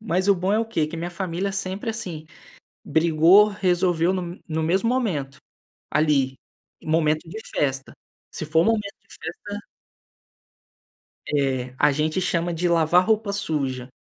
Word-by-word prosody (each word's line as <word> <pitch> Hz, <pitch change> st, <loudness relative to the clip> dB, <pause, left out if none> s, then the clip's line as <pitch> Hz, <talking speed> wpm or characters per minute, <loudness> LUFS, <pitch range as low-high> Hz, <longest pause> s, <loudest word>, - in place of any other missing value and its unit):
Mas 190 Hz, -2 st, -1 dB
o 200 Hz, -, +7 dB
bom 185 Hz, +2 st, -1 dB
é 215 Hz, -, +3 dB
o 225 Hz, -, +1 dB
quê? 165 Hz, -9 st, -1 dB
Que 160 Hz, +2 st, -7 dB
a -, -, -5 dB
minha 175 Hz, +1 st, -4 dB
família 185 Hz, +2 st, -3 dB
sempre, 195 Hz, +3 st, -3 dB
assim, 170 Hz, -8 st, -6 dB, 0.6 s
brigou, 170 Hz, +6 st, +5 dB
resolveu 180 Hz, -3 st, +1 dB
no 180 Hz, -1 st, -4 dB
no 160 Hz, 0 st, -1 dB
mesmo 190 Hz, +7 st, +1 dB
momento, 165 Hz, -, -1 dB, 0.5 s
ali, 145 Hz, -4 st, +2 dB, 0.5 s
em -, -, -11 dB
momento 155 Hz, 0 st, +1 dB
de 220 Hz, +6 st, -7 dB
festa. 135 Hz, -2 st, -2 dB, 0.4 s
Se -, -, -5 dB
for 160 Hz, +2 st, +3 dB
momento 210 Hz, -3 st, 0 dB
de -, -, -13 dB
festa 205 Hz, +6 st, -7 dB, 1.7 s
É, 130 Hz, -3 st, 0 dB
a -, -, +5 dB
gente 155 Hz, +5 st, 0 dB
chama 175 Hz, -1 st, 0 dB
de 175 Hz, +2 st, 0 dB
"lavar 170 Hz, +2 st, +4 dB
roupa 220 Hz, -2 st, +1 dB
suja". 140 Hz, -10 st, -2 dB
170 Hz, 155 wpm, -23 LUFS, 155-195 Hz, 1.7 s, o